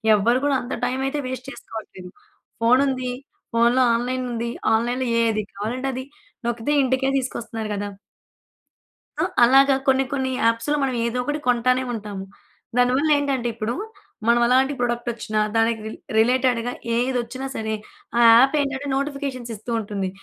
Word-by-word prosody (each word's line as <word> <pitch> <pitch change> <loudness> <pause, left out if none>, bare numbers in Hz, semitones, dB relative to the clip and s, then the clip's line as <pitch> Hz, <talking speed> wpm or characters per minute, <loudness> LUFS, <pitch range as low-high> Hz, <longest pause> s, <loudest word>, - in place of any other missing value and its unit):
ఎవ్వరూ 230 +4 +3
కూడా 285 -1 +2
అంత 245 - -6
టైమ్ 255 +2 -1
అయితే 290 +2 -2
వేస్ట్ 255 0 -6
చేసుకోవట్లేదు. 205 -8 -9 0.5
ఫోన్ 240 +3 +5
ఉంది, 255 -2 -2 0.4
ఫోన్‌లో 235 +2 +4
ఆన్‌లైన్ 255 +2 -2
ఉంది. 235 0 -2 0.2
ఆన్‌లైన్‌లో 245 +3 0 0.2
ఏది 220 -2 +1
కావాలంటే 240 +7 -3
అది, 260 +1 -5 0.4
నొక్కితే 235 +4 -1
ఇంటికే 260 +1 +1
తీసుకొస్తున్నారు 230 -4 -4
గదా! 205 0 -3 1.3
అ! - - +3 0.2
అలాగా 270 +3 +6
కొన్ని, 265 0 +4
కొన్ని 265 -1 -1
యాప్స్‌లో 230 +6 +1
మనం 265 -2 0
ఏదో 235 +1 -2
ఒకటి 295 +4 -2
కొంటానే 250 +1 +2
ఉంటాము. 205 -3 -6 0.5
దానివల్లేంటంటే 270 0 +2
ఇప్పుడు, 225 +1 -3 0.5
మనం 235 0 +4
ఎలాంటి 260 +3 +3
ప్రొడక్టొచ్చినా 240 -3 -2 0.2
దానికి 225 0 +2
రి - - -5 0.3
రిలేటెడ్‌గా 245 +1 +2 0.2
ఏదొచ్చినా 250 +1 -1
సరే, 220 0 -2 0.4
ఆ - - +4
యాప్ 265 +5 +6
ఏంటంటే 280 0 -3
నోటిఫికేషన్స్ 275 -3 -3
ఇస్తూ 220 +3 -7
ఉంటుంది. 200 -3 -3
245 Hz, 135 wpm, -23 LUFS, 230-265 Hz, 1.3 s, అలాగా